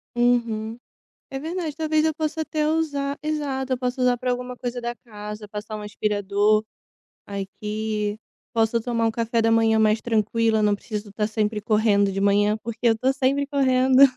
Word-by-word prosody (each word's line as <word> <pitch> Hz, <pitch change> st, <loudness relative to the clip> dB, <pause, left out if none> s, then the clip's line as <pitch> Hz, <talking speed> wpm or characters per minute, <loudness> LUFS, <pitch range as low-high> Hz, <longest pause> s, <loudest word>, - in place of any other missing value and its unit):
Uhum, 235 Hz, -2 st, +1 dB, 0.5 s
é 270 Hz, -, -4 dB
verdade, 320 Hz, 0 st, -4 dB
talvez 310 Hz, -1 st, +1 dB
eu 315 Hz, -1 st, +1 dB
possa 315 Hz, 0 st, -2 dB
até 310 Hz, -1 st, -1 dB
usar, 290 Hz, -3 st, -1 dB
exato, 275 Hz, -4 st, -1 dB
eu -, -, -6 dB
posso 250 Hz, +1 st, -2 dB
usar 250 Hz, -1 st, +3 dB
para 250 Hz, +1 st, -2 dB
alguma 250 Hz, 0 st, -3 dB
coisa 245 Hz, 0 st, -4 dB
da 240 Hz, 0 st, -3 dB
casa, 210 Hz, -1 st, -8 dB
passar 210 Hz, +1 st, -6 dB
um 210 Hz, -, -7 dB
aspirador, 210 Hz, 0 st, +1 dB, 0.6 s
aqui, 210 Hz, +1 st, -3 dB, 0.4 s
posso 225 Hz, 0 st, +2 dB
tomar 230 Hz, -1 st, -1 dB
um -, -, +2 dB
café 230 Hz, 0 st, 0 dB
da 225 Hz, 0 st, +3 dB
manhã 225 Hz, -1 st, +4 dB
mais 215 Hz, 0 st, +3 dB
tranquila, 225 Hz, 0 st, +1 dB
não 205 Hz, -1 st, +3 dB
preciso 210 Hz, 0 st, -6 dB
estar 210 Hz, +1 st, -1 dB
sempre 215 Hz, -1 st, -1 dB
correndo 210 Hz, -2 st, +3 dB
de 195 Hz, 0 st, -3 dB
manhã, 205 Hz, +1 st, +3 dB
porque 235 Hz, 0 st, -6 dB
eu 225 Hz, -, +3 dB
tô 260 Hz, +2 st, +2 dB
sempre 275 Hz, +1 st, +1 dB
correndo. 260 Hz, -2 st, +4 dB
230 Hz, 175 wpm, -24 LUFS, 210-265 Hz, 0.6 s, manhã